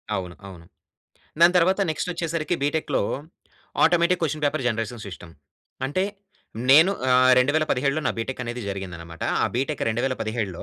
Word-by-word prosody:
అవును. 90 -3 -5
అవును. 90 -3 -12 0.8
దాని 175 +2 +6
తర్వాత 185 +3 +2
నెక్స్టొచ్చేసరికి 165 0 -2
బీటెక్‌‌లో 150 +2 0 0.8
automatic 175 +1 +3
question 155 -1 -1
paper 145 -1 0
generation 115 0 -3
system. 90 -3 -10 0.5
అంటే 145 +7 -1 0.7
నేను 160 +7 +7 0.2
ఆహ్, 130 0 +5
2017లో 145 +1 +1
నా - - +2
బిటెక్ 125 +3 -4
అనేది 120 0 -5
జరిగిందనమాట. 90 -4 -7 0.2
ఆ - - +4
బీటెక్ 135 +4 -2
2017లో 110 -5 -2
130 Hz, 125 wpm, -24 LUFS, 110-155 Hz, 0.8 s, నేను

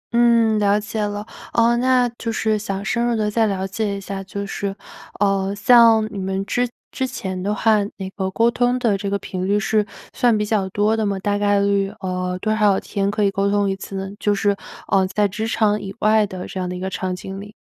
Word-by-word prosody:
嗯， 230 -2 +4
了 205 0 +3
解 215 +1 -4
了。 205 0 -3 0.3
呃， 235 0 +4
那 250 0 +3
就 230 - -2
是 220 -1 0
想 200 -1 -4
深 235 +3 0
入 240 -1 +1
地 210 -1 0
再 225 0 +2
了 190 -2 -2
解 200 +1 -2
一 - - -5
下 195 0 -6
就 200 +1 -5
是， 195 0 -4 0.4
呃， 195 -1 +1
像 225 +1 +6
你 200 - -4
们 190 +1 -2
之 245 +4 0 0.2
之 260 - -2
前 190 -7 -5
的 200 +3 -1
话， 220 +1 +3 0.2
那 190 - -5
个 190 -2 -2
沟 230 +5 +2
通 245 +1 +1
的 230 -5 +1
这 200 0 -3
个 200 - 0
频 185 -1 -4
率 205 +1 +2
是 215 +1 +1 0.3
算 240 -4 +3
比 210 - 0
较 205 -3 0
多 210 +3 +1
的 220 - -1
吗？ 200 -1 0
大 205 +1 -1
概 205 0 +3
率， 200 -1 +1
呃， 180 -1 -2
多 215 +3 0
少 205 -3 +3
天 200 0 -2
可 210 +1 0
以 200 - +3
沟 200 0 0
通 205 0 +2
一 195 - 0
次 195 0 -8
呢？ 195 0 -4
就 205 -1 +1
是， 200 0 +1 0.3
呃， 190 -1 +3
在 205 +2 +1
职 220 +3 -4
场 210 -2 +1
以 195 0 -7
外 215 0 +4
的 185 -2 -7
这 190 - -6
样 180 - -2
的 180 - -4
一 - - -6
个 190 +1 -4
场 185 0 -2
景 195 +1 -7
里。 205 +1 -11
205 Hz, 255 characters per minute, -21 LUFS, 195-220 Hz, 0.4 s, 像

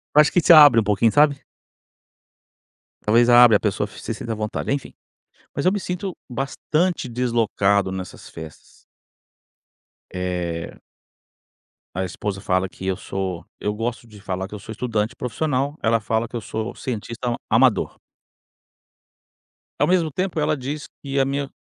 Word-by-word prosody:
Eu 150 - +9
acho 150 - +3
que 175 - +3
te 170 - +7
abre 145 -7 +9
um - - +2
pouquinho, 105 +2 +2
sabe? 145 +1 +4 1.7
Talvez 120 +3 +4
abre 120 -2 +8
a - - +4
pessoa 105 -1 -1
se 110 - -6
sinta 115 +1 -6
à - - -4
vontade 110 +4 -3
enfim. 140 -1 -3 0.6
Mas 140 - -2
eu 185 - +5
me 205 - -1
sinto 180 0 -4
bastante 140 +6 -1
deslocado 115 -5 +1
nessas 95 -1 -7
festas. 80 -2 -12 1.3
Eh. 90 -2 -4 1.2
A 95 - -1
esposa 95 +2 -4
fala 95 0 0
que 95 - -10
eu 95 -1 0
sou 95 -3 -4
eu 105 - -1
gosto 115 +2 -4
de 105 -2 -14
falar 95 -1 -3
que 105 - -13
eu - - -7
sou 110 - -10
estudante 110 0 -2
profissional, 140 +3 -2
ela 115 +1 +2
fala 110 +2 -1
que 120 - -10
eu 120 - -3
sou 110 +1 -5
cientista 120 0 -4
amador. 120 0 +3 1.8
Ao - - +3
mesmo 175 -3 +2
tempo 185 +1 -2
ela 150 0 +1
diz 140 +3 -5 0.2
que 140 -1 -1
a 135 - +3
minha, 140 0 -2
115 Hz, 155 wpm, -22 LUFS, 100-140 Hz, 1.8 s, Eu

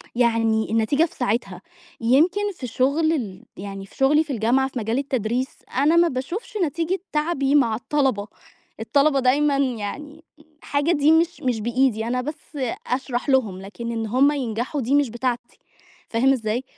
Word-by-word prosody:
يعني 225 -2 +2
النتيجة 225 +7 +2
في 335 - -11
ساعتها. 210 -6 -2 0.4
يمكن 305 - +3
في 265 -8 -7
شُغل 280 +7 +1
ال 215 - -4
يعني 195 0 -7
في - - -20
شُغلي 295 +4 +4
في 295 -3 -5
الجامعة 245 +4 +2
في 265 -2 -5
مجال 225 +2 -1
التدريس، 255 -2 -1 0.3
أنا 295 +5 +4
ما 340 0 +5
باشوفش 340 - -5
نتيجة 330 +5 -2
تعبي 300 -3 +1
مع 235 -6 +3
الطلبة. 250 -4 0 0.5
الطلبة 280 +5 +2
دايمًا 280 +3 +3
يعني 275 +5 -3 0.4
حاجة 285 +3 0
دي 295 -2 +4
مش 330 +2 +2
مش 245 -4 -1
بإيدي، 235 -1 +1
أنا 250 +1 0
بس 300 +2 -8 0.3
أشرح 255 +1 -2
لهم، 220 -9 +1
لكن 230 +4 -6
إن 225 -1 -2
هم 265 +6 +4
ينجحوا 255 +1 -2
دي 255 +4 +1
مش 285 -3 +3
بتاعتي، 240 +1 -3 0.5
فاهم 260 +4 +3
إزاي؟ 230 0 -2
260 Hz, 155 wpm, -23 LUFS, 230-290 Hz, 0.5 s, ما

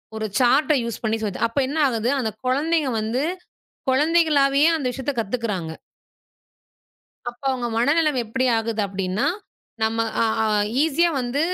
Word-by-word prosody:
ஒரு 220 0 -3
chart 270 +5 +4
use 230 -2 -5
பண்ணி 220 0 0
சொல்லித் 205 -4 -3
தராங்க. 230 - +1
அப்ப 280 - +1
என்ன 290 +4 -4
ஆகுது? 230 -2 -1
அந்தக் 220 -4 -4
குழந்தைங்க 295 +3 +1
வந்து 225 +5 -1 0.7
குழந்தைகளாவே 290 -1 +3
அந்த 300 -5 -3
விஷயத்தைக் 265 0 -3
கத்துக்கறாங்க. 205 -7 -3 1.6
அப்ப 240 +2 -25
அவங்க 250 -2 -2
மனநிலைமை 290 +3 +2
எப்படி 260 +4 -1
ஆகுது? 225 -1 -2
அப்படின்னா, 195 0 -2 0.6
நம்ம 225 +1 +1 0.2
அ - - +3 0.2
அ - - +1 0.4
ஈஸியா 320 +2 +2
வந்து 245 +3 -2
250 Hz, 140 wpm, -22 LUFS, 220-285 Hz, 1.6 s, chart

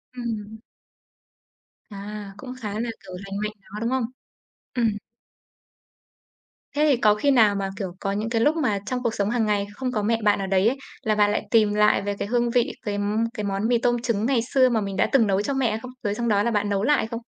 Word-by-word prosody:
Ừm. 220 -3 -5 1.3
À, 205 0 -7
cũng 255 +1 -8
khá 210 -2 -4
là, 235 +1 -2
kiểu, 190 - -13
lành 195 0 -5
mạnh 210 - -2
đó, 200 +2 -9
đúng 230 +2 -1
không? 260 -2 0 0.7
Ừm. 235 -2 +2 1.9
Thế 300 +1 +3
thì 270 - +4
có 210 -3 +4
khi 280 +7 +2
nào 220 -6 +5
mà, 195 -1 -2
kiểu, 190 -3 -3
có 195 - -2
những 215 +3 -2
cái 230 -1 +1
lúc 295 +7 +3
mà 255 -11 +1
trong 250 +2 -3
cuộc 235 -2 0
sống 200 0 0
hằng 235 -1 +1
ngày 205 -1 0
không 255 +3 -3
có 215 -4 -1
mẹ 225 +2 +1
bạn 205 -1 +3
ở 195 - -2
đấy 190 +1 +3
ấy, 260 +4 +1 0.3
là 215 -3 +1
bạn 205 -1 +4
lại 210 - -2
tìm 215 -3 +4
lại 210 0 +4
về 205 0 -2
cái - - -2
hương 240 +1 +1
vị, 245 +2 +2
cái, 205 -1 -1
ưm, 205 +2 0
cái 210 - -2
món 200 +1 -1
mì 240 0 +3
tôm 240 0 +1
trứng 230 -3 0
ngày 260 -1 +2
xưa 260 -2 +5
mà 225 -2 +1
mình 195 -1 -4
đã - - +2
từng 250 -6 +4
nấu 195 0 +2
cho 275 - -2
mẹ 265 -4 +1
hay 220 - -2
không? 255 +2 -9
Rồi 205 0 -1
xong 235 +2 -2
đó 205 -2 +3
là 235 - +1
bạn 205 -1 0
nấu 200 0 0
lại 290 -5 +2
không? 230 +1 -5
215 Hz, 245 wpm, -24 LUFS, 205-240 Hz, 1.9 s, nào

